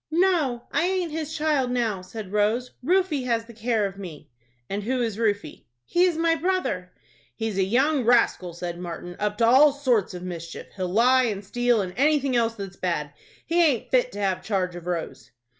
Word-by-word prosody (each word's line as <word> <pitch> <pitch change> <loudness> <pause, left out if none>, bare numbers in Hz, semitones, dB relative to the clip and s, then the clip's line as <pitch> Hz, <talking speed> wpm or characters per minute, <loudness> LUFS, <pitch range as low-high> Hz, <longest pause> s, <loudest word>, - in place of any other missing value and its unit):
"No, 315 -8 +1
I 340 - +1
aint 365 -3 -1
his 315 0 -4
child 300 -5 +1
now," 230 -6 -1
said 190 +1 -8
Rose. 215 +4 +1
"Rufie 345 -4 +1
has 230 -2 0
the 235 - -13
care 225 -1 0
of 195 0 -6
me." 165 -10 -9 0.4
"And 200 +1 -3
who 250 +5 -1
is 225 -3 -2
Rufie?" 205 - -2 0.2
"He 350 +1 +3
is 350 -3 +1
my 330 0 +3
brother." 330 - -1 0.4
"He's 220 -4 -2
a - - +4
young 265 +8 +2
rascal," 230 -7 +2
said 175 0 -5
Martin, 175 0 -7
"up 210 0 -1
to 230 - +3
all 270 +5 +7
sorts 250 -9 0
of 180 - -7
mischief. 170 -2 -7
He'll 185 -2 -3
lie 250 +6 +4
and 205 -3 -3
steal, 245 +1 +1
and 180 -1 -6
anything 280 -2 +2
else 230 -1 +1
that's 195 -3 -8
bad. 150 -5 -2 0.3
He 340 +1 +3
aint 280 -8 +1
fit 250 -1 +3
to 205 - -6
have 190 -2 0
charge 185 -3 -1
of 175 0 -9
Rose." 170 -2 -4
230 Hz, 195 wpm, -25 LUFS, 190-280 Hz, 0.4 s, all